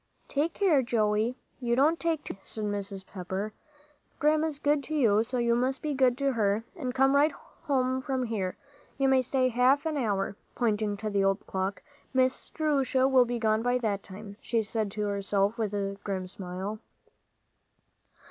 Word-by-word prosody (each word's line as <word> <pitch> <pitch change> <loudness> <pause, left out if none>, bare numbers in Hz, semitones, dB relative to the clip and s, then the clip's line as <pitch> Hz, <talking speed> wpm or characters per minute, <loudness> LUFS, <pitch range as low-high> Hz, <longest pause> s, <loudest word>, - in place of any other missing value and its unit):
"Take 310 +4 -1
care, 350 -9 +4
Joey, 225 0 +1 0.2
you 235 -2 +1
don't 305 +6 +3
take 325 -3 0
too - - -5
many," 195 - -20
said 215 - -4
Mrs. 200 -2 -3
Pepper. 190 +3 -5 0.6
"Grandma's 305 0 +2
good 290 0 +1
to 310 - -3
you, 220 -7 +4
so 250 +2 -3
you 235 -1 +2
must 255 +3 0
be 300 -1 -1
good 260 -2 +3
to 275 0 +1
her, 210 -1 +1
and 265 -8 -3
come 270 +1 +4
right 295 +2 +5
home 260 -4 -2
from 260 -1 -1
here. 205 -6 -2 0.4
You 270 0 +2
may 265 -1 +5
stay 255 0 +1
half 255 +5 +3
an 315 -2 -1
hour," 205 -6 -1 0.2
pointing 215 -3 0
to 215 +1 -4
the 200 -1 +2
old 195 0 +1
clock. 190 +1 -3 0.3
"Miss 260 0 +1
Jerusha 275 -4 +1
will 260 -2 +5
be 240 0 -2
gone 220 -1 +2
by 245 +1 +2
that 210 -5 -1
time," 200 +1 -10
she 230 -2 0
said 215 0 -2
to 210 +2 -5
herself 200 +2 0
with 215 -3 0
a 200 -1 -3
grim 190 -2 -3
smile. 190 +3 -5
235 Hz, 180 wpm, -29 LUFS, 205-270 Hz, 0.6 s, right